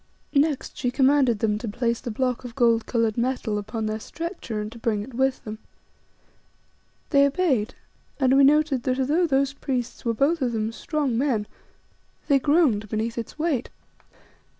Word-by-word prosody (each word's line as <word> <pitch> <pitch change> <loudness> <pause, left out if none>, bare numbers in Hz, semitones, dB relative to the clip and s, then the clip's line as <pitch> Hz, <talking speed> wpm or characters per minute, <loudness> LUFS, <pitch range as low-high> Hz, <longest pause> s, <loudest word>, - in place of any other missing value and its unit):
Next 290 -1 +1
she 245 - 0
commanded 265 -2 +3
them 210 0 0
to 230 - -5
place 235 +2 -1
the - - -5
block 250 +2 -1
of 240 -2 -9
gold 230 -3 +3
coloured 230 -2 0
metal 235 -4 -1
upon 215 +2 -4
their 215 0 -2
stretcher 330 - -5
and 210 0 -4
to 235 - -11
bring 215 -3 -1
it 260 - -11
with 265 +2 0
them. 215 0 -7 1.5
They 280 -2 +6
obeyed, 275 - 0 0.4
and 265 -1 +4
we 275 - +6
noted 290 -2 +4
that, 255 +1 -1
although 305 +7 +2
those 275 -1 +1
priests 255 -4 -4
were 230 -1 0
both 295 +7 +2
of 245 -2 0
them 220 0 -1
strong 275 -2 -1
men 250 -7 0 0.8
they 280 -2 +4
groaned 270 - +2
beneath 220 +2 -2
its 235 +3 -6
weight. 305 -6 -1
250 Hz, 170 wpm, -24 LUFS, 225-280 Hz, 1.5 s, They